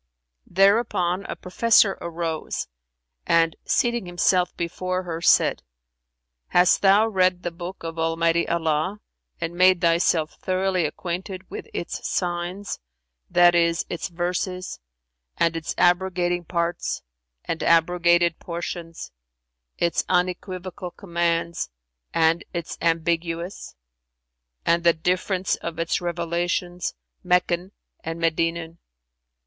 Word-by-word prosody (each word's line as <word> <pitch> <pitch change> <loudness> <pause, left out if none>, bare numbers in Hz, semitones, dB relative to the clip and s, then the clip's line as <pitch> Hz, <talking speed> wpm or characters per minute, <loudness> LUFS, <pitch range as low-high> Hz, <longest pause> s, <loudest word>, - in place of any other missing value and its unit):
Thereupon 195 -1 +2
a - - -5
professor 200 +1 +3
arose 165 -1 -3 0.6
and, 165 -1 +3
seating 240 -5 +1
himself 180 0 +1
before 185 +2 -2
her, 165 -2 -5
said - - +4 0.9
"Hast 180 0 +4
thou 200 +3 +5
read 185 -3 +2
the 175 - -2
Book 175 +2 -8
of 165 0 -5
Almighty 165 +1 +1
Allah 165 +4 0 0.4
and 165 0 -3
made 185 +1 +5
thyself 165 -2 +2
thoroughly 185 -2 +1
acquainted 185 +3 -6
with - - -7
its 175 - -4
signs, 175 +3 -2 0.5
that 175 0 +6
is 170 -1 +2
its 175 - -3
verses, 180 +1 -3 0.6
and 165 -1 +2
its 165 -1 -4
abrogating 175 -1 +2
parts 170 - -2 0.4
and 165 - -3
abrogated 170 0 +3
portions, 170 -1 -6 0.7
its 170 -1 +1
unequivocal 180 0 -2
commands 170 - -1 0.4
and 165 0 +2
its 170 -1 -4
ambiguous; 170 +2 -1 0.9
and 170 0 +3
the 170 -1 +6
difference 180 +3 0
of 165 -1 -6
its 165 +1 0
revelations, 175 +1 -2 0.3
Meccan 180 0 +1 0.3
and 165 +1 -4
Medinan? 165 0 -1
175 Hz, 105 wpm, -24 LUFS, 170-185 Hz, 0.9 s, that